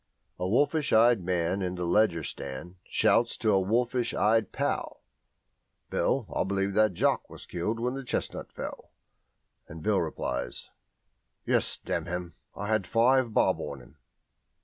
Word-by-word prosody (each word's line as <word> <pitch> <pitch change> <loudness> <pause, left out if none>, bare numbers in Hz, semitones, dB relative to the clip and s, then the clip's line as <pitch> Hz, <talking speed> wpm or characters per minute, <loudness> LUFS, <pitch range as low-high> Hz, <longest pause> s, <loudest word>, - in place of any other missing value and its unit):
A 90 - -1
wolfish 145 +6 +2
eyed 115 -1 +5
man 90 +1 0
in 90 -1 -2
the 90 -1 -3
Leger 85 -3 +3
stand 90 +7 -6
shouts 120 0 +2
to 110 - +1
a 95 - +4
wolfish 120 +4 0
eyed 110 -1 +2
pal, - - -2 0.9
"Bill, 135 -4 +1
I - - +2
believe 100 0 -1
that 110 -1 +3
jock - - +1
was - - -9
killed 105 +7 -3
when 125 +2 -1
the 135 0 -5
chestnut 125 - -3
fell," - - -8 0.7
and 80 0 -10
Bill - - +2
replies, 60 -1 -4 0.7
"Yes, - - +1
damn 85 0 -3
him, 90 -1 -4 0.2
I 100 - -5
had 110 -3 0
five 120 +4 +3
bob - - +3
on 70 - -5
him." 65 +4 -17
100 Hz, 150 wpm, -28 LUFS, 90-115 Hz, 0.9 s, eyed